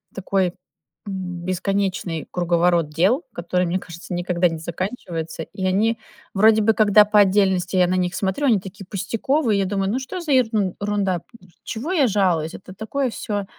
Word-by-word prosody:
такой 190 -2 0 0.6
бесконечный 185 -1 -2
круговорот 175 -2 +2
дел, 190 - +2
который, 180 +1 -1
мне 175 +2 -1
кажется, 170 0 -9
никогда 175 0 +1
не 165 - -5
заканчивается. 165 -2 -5
И 190 - -5
они 215 +5 +2 0.4
вроде 220 +2 +5
бы, 220 +1 +4
когда 210 -1 +6
по 210 0 +3
отдельности 190 -2 +3
я 180 -1 +5
на 185 - 0
них 180 -1 0
смотрю, 195 +10 -1
они 225 -6 +4
такие 195 +2 -10
пустяковые. 220 - 0
Я 195 - +1
думаю: 195 0 -1
"Ну 250 - 0
что 270 +8 -6
за 325 -5 -1
ерунда, 205 -5 0 0.4
чего 275 +11 -4
я 290 -8 +4
жалуюсь? 180 -7 +1
Это 185 - -11
такое 245 +7 -2
всё, 205 -3 -4
195 Hz, 160 wpm, -22 LUFS, 180-215 Hz, 0.6 s, когда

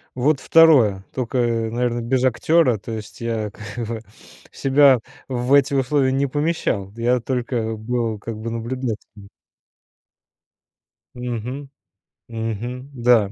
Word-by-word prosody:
Вот 135 +3 +2
2, 130 -12 +5
тока, 130 0 -2
э, 115 -2 +1
наверно, 120 +1 -1
без 125 +2 0
актёра. 130 +1 +3
То 115 +3 -7
есть 105 -1 -8
я 115 -3 -2
как 105 +3 -7
бы 115 0 -4 0.5
себя 135 -1 +4 0.3
в 125 0 -2
эти 140 0 +4
условия 135 0 +2
не 135 +1 +1
помещал, 145 - -1
я 120 +2 +1
только 120 -2 -2
был 115 0 -2
как 110 +2 -6
бы 110 +2 -5
наблюдателем. 115 -3 -5 1.9
Мгм. 125 +3 -5 0.6
Мгм. 115 +3 -4
Да. 120 -5 +3
120 Hz, 120 wpm, -21 LUFS, 115-130 Hz, 1.9 s, 2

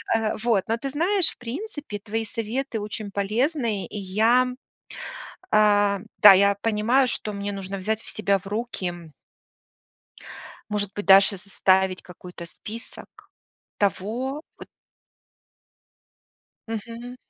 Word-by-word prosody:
Э, 220 -1 0
вот, 225 -5 +2
но 225 - 0
ты 275 +4 -4
знаешь, 340 +6 +2
в - - -12
принципе, 285 - -6
твои 225 +2 -3
советы 230 +2 -3
очень 210 0 -5
полезные. 220 - 0
И 210 - -8
я, 220 +6 +3 1.1
э, 205 -1 +4 0.2
да, 205 -2 +11
я 200 +1 +4
понимаю, 225 +4 +3
что 215 -2 -2
мне 200 0 -3
нужно 195 0 -5
взять 215 +3 -1
в - - -7
себя 200 -2 +1
в 190 - -18
руки 185 -7 -4 1.6
может 205 -2 -1
быть, 205 - -5
даже 195 +1 +7
составить 190 -1 +1
какой-то 180 0 -10
список 225 +7 -10 0.7
того 230 - -1 0.2
вот - - -11 2.0
Мгм. 230 +2 -6
210 Hz, 120 wpm, -24 LUFS, 200-235 Hz, 2.0 s, да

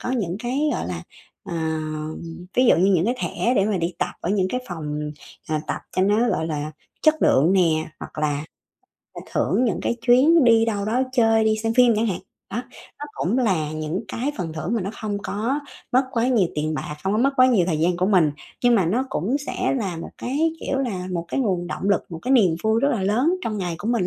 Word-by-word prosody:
có 245 - -3
những 195 -8 -1
cái 250 +4 -2
gọi - - -2
là, - - -5 0.4
ờ, 175 - -6 1.0
ví 255 - +5
dụ - - +6
như 190 +3 +3
những 170 - +2
cái 240 +4 +1
thẻ 245 +1 0
để 195 - +4
mà 210 -1 0
đi 170 0 -2
tập - - -2
ở 175 - -2
những 190 -2 +1
cái 250 +4 -2
phòng, 150 -3 -4 0.4
ờ, 155 -1 0
tập - - -3 0.2
cho 185 - +3
nó 210 +5 +3
gọi 160 - 0
là 155 -1 -3 0.3
chất 310 -1 +5
lượng 155 +7 +4
nè, 160 -5 +2
hoặc - - -9
là 150 -1 -1 0.9
thưởng 250 - +2
những 230 - 0
cái 235 - 0
chuyến 275 +5 +6
đi 230 -1 +5
đâu 205 -3 -1
đó 235 +5 +1
chơi, 225 -3 +3
đi 215 0 +2
xem 225 +1 -1
phim 250 -2 +6
chẳng 225 +2 +1
hạn. 190 - -2 0.3
Đó, 240 +5 -2 0.4
nó 290 - -5
cũng 210 +9 -1
là 175 -11 +1
những 155 +4 -3
cái 270 +5 -2
phần 170 -4 -3
thưởng 160 +8 -3
mà 225 - 0
nó 190 - -3
không 205 -2 -2
có 235 +8 -1 0.3
mất 255 +2 +5
quá 235 0 +1
nhiều 215 -9 +3
tiền 155 +1 -1
bạc, 150 0 -5
không 190 +1 0
có 215 - +1
mất 275 +3 +3
quá 255 0 +7
nhiều 210 -9 +3
thời 160 -4 0
gian 175 +1 +2
của 185 +1 +1
mình 180 -7 +4 0.3
nhưng 245 -1 +6
mà 190 -6 +3
nó 250 +9 0
cũng 220 - 0
sẽ - - -1
là 190 -7 -3
một 165 - -7
cái, 300 +6 0
kiểu 270 - -2
là 195 -9 -2
một 170 -1 -2
cái 275 - -1
nguồn 185 -8 0
động 190 +2 -3
lực, 200 - +2
một 165 - -6
cái 260 - 0
niềm 190 -10 +4
vui 220 +1 +2
rất 280 - +3
là 220 -8 -1
lớn 245 - +2
trong 215 -2 -2
ngày 175 -3 -2
của 210 - -4
mình 230 -7 +1
205 Hz, 240 wpm, -23 LUFS, 175-245 Hz, 1.0 s, quá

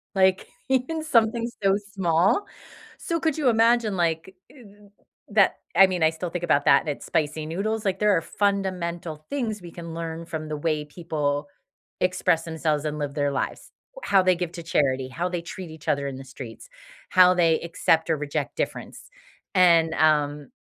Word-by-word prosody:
Like, 190 0 +3 0.2
even 265 +5 0
something 230 -5 +2 0.2
so 195 0 +4 0.2
small. 185 - +2 0.5
So 335 0 -2
could 320 -2 0
you 285 -5 +3
imagine, 230 -2 +3
like, 170 +2 -1 0.2
uh, 210 -7 -17 0.4
that 200 -2 +4 0.2
I 195 - +8
mean, 180 -3 -1
I 160 - +4
still 165 +2 -5
think 175 +1 -5
about 145 -4 +2
that, 140 - +6
and - - -5
it's 145 - -5
spicy 155 0 -1
noodles. 210 +7 -2
Like, 190 -1 0
there 210 -2 +4
are - - 0
fundamental 175 -6 -2
things 230 -7 -3
we 175 -1 -10
can 170 -1 -8
learn 165 0 -5
from 155 -1 -5
the 155 0 -4
way 150 0 -1
people 150 -2 -3 0.5
express 165 - +1
themselves 155 -2 -1
and 150 0 -3
live 145 -1 -4
their 145 -1 0
lives, - - -4 0.3
how 195 - +4
they 185 0 +4
give 175 -1 -3
to 170 - -7
charity, 135 -5 0
how 170 +7 -2
they 175 -1 -3
treat 175 0 -8
each 160 -1 -13
other 140 0 0
in 135 -1 -5
the 135 - -8
streets, 125 -4 -10 0.4
how 180 0 +6
they 165 -3 +3
accept 165 -1 +1
or 155 - +1
reject 145 -1 -3
difference. - - -5 0.5
And, 170 -3 +5
um, 150 -2 +2
170 Hz, 180 wpm, -25 LUFS, 155-195 Hz, 0.5 s, I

